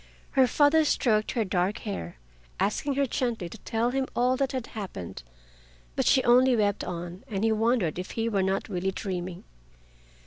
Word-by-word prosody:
Her 265 -2 +4
father 290 +5 +4
stroked 215 -7 +1
her 230 -3 0
dark 185 +3 0
hair, 85 - -5 0.4
asking 275 +7 0
her 280 0 +2
gently 235 -8 -2
to 225 - -10
tell 230 +4 -1
him 265 0 -1
all 250 +1 +3
that 270 0 0
had 255 -3 -3
happened, 190 - -6 0.7
but - - 0
she 260 - +5
only 250 +1 +5
wept 205 -2 +1
on, 175 +1 -6
and 200 -2 -3
he 225 - +3
wondered 220 -7 +1
if 185 - -5
he 225 0 +1
were 205 -4 +1
not 190 +1 0
really 190 -1 -1
dreaming. 185 -2 -5
220 Hz, 175 wpm, -27 LUFS, 190-255 Hz, 0.7 s, she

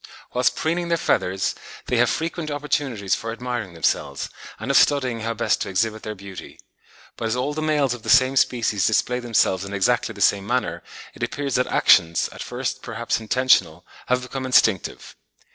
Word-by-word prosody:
Whilst 125 0 +2
preening 170 +2 -1
their 170 0 +1
feathers, 95 - 0 0.3
they - - 0
have - - +4
frequent 165 -1 -3
opportunities 140 -8 -1
for 115 +1 -2
admiring 120 -6 -5
themselves, 70 -3 -1 0.3
and - - -2
of - - +5
studying 130 -5 +3
how 115 +1 -3
best 115 - 0
to - - -2
exhibit 110 +3 -1
their 110 0 -6
beauty. 100 -1 -10 0.6
But 115 - -4
as 110 - 0
all 130 +4 -1
the 155 - -3
males 150 -4 +1
of 120 - -8
the - - -7
same 130 +2 +5
species 115 -7 +2
display 125 +3 +1
themselves 115 -6 +1
in 100 0 -7
exactly 110 +3 +1
the 100 - -12
same 100 0 +3
manner, 125 +2 -1 0.3
it - - -14
appears 140 -2 -2
that 125 +1 +1
actions, 85 -3 +4
at - - -10
first 130 +1 -4
perhaps 115 0 -2
intentional, 105 -8 +2 0.2
have 125 0 +1
become 130 +1 -5
instinctive. 110 -7 +1
120 Hz, 180 wpm, -23 LUFS, 100-130 Hz, 0.6 s, of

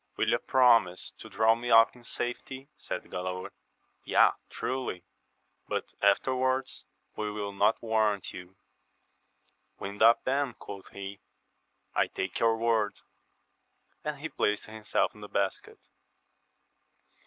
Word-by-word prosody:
Will - - +1
ye - - +4
promise 115 -8 +3
to - - -9
draw 110 +1 +4
me 120 +1 -4
up 115 0 +6
in 120 - -16
safety? 130 +3 -5
said - - -5
Galaor. 90 0 -5 0.3
— - - -44
Yea, - - +5 0.2
truly 130 -7 -3
3 - - -43 0.6
but - - -3
afterwards 130 +6 +1 0.3
we 105 0 -2
will 105 -1 -4
not 100 +3 +2
warrant 110 -3 +1
you. 90 +1 -10 1.2
Wind 100 +1 -7
up, 115 +1 +6
then, 135 -1 0
quoth 100 -1 -10
he, 100 0 -8 0.7
I - - +2
take 95 -1 -4
your 115 -1 +3
word! 110 -2 +1 1.0
and 150 -1 -3
he 160 +2 -4
placed 105 -7 0
himself 110 0 -1
in 105 - -15
the 105 - -9
basket. 95 -1 -3
110 Hz, 130 wpm, -29 LUFS, 100-120 Hz, 1.2 s, up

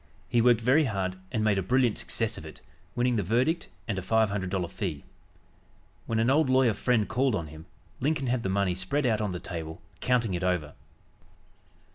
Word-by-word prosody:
He 120 - +2
worked 120 -1 +4
very 135 +7 +4
hard 95 -5 -2
and 110 - 0
made 105 -2 +2
a - - +1
brilliant 125 +3 +2
success - - -2
of - - -8
it, - - -10 0.4
winning 120 -1 +1
the - - +2
verdict 125 - 0 0.2
and 100 -5 -1
a - - -5
five 110 +2 +2
hundred 95 -2 -2
dollar 90 -2 -1
fee. 90 -5 -4 1.0
When 115 - -1
an 115 +3 +3
old 150 -1 +3
lawyer 130 -3 +4
friend 115 -1 +1
called 130 -2 +1
on 80 -5 -4
him, 80 +3 -12 0.3
Lincoln 140 0 0
had 125 -1 0
the 95 - -2
money 95 -1 +1
spread 95 +11 -1
out 110 -3 +2
on 105 -2 -1
the 90 - -4
table 80 -3 -6 0.2
counting 120 -5 +1
it 90 +1 -2
over. 90 -5 0
110 Hz, 200 wpm, -28 LUFS, 95-125 Hz, 1.0 s, worked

